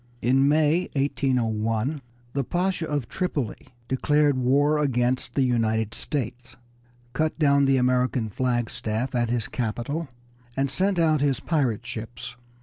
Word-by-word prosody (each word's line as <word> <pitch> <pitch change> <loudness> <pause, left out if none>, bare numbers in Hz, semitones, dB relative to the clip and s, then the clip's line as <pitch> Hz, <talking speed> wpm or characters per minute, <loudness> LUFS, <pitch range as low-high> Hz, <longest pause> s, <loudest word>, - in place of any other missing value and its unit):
In 135 +3 +4
May, 155 +4 +2
1801, 125 -2 0 0.3
the 140 - 0
Pasha 180 +3 -1
of 145 -6 -2
Tripoli 145 - -3 0.2
declared 145 +2 +2
war 140 +4 +2
against 125 -3 0
the 135 - +3
United 110 -3 +1
States, 125 -2 -3 0.6
cut 155 +4 0
down 140 -2 +4
the 135 0 +3
American 125 -2 +1
flagstaff 120 0 -2
at 120 -2 +1
his 120 -2 0
capital, 125 +7 -3 0.5
and 135 0 +1
sent 190 +6 +1
out 155 -3 +3
his 140 -3 +1
pirate 130 -9 0
ships. 115 +1 -7
130 Hz, 130 wpm, -25 LUFS, 120-145 Hz, 0.6 s, In